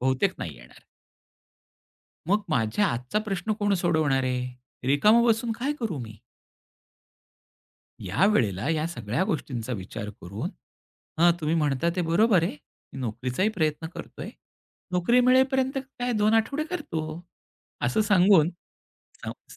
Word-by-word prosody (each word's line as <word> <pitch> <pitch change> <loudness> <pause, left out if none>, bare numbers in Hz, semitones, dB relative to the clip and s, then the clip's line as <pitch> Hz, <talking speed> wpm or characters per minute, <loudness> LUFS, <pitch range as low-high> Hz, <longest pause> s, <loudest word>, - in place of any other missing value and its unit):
बहुतेक 130 +9 +1
नाही 80 -4 -6
येणार. - - -16 1.5
मग 205 +3 +3
माझ्या 115 - +2
आजचा 125 - -1
प्रश्न 215 0 -2
कोण 205 -1 +1
सोडवणार 155 -6 +1
आहे? 125 0 -1 0.4
रिकामा 210 +12 +5
बसून 230 0 +2
काय 260 +6 -2
करू 195 - -2
मी? 110 -3 -9 1.9
यावेळेला 110 - +2
या 160 0 0
सगळ्या 120 - -2
गोष्टींचा 130 - -3
विचार 105 0 -5
करून, 100 +4 -5 0.7
"हां, 175 +1 +6
तुम्ही 155 +1 0
म्हणता 150 0 +1
ते - - +1
बरोबर 180 +3 +3
आहे. 165 - -2 0.4
मी 135 - -8
नोकरीचाही 125 - -1
प्रयत्न 155 0 0
करतोय. - - -8 0.6
नोकरी 180 +8 +3
मिळेपर्यंत 260 +1 +3
काय 250 -2 -4
2 215 0 +3
आठवडे 275 +7 +1
करतो." 160 - -4 0.7
असं 125 - +1
सांगून 190 -5 +5 1.0
स - - -12
165 Hz, 125 wpm, -26 LUFS, 125-215 Hz, 1.9 s, हां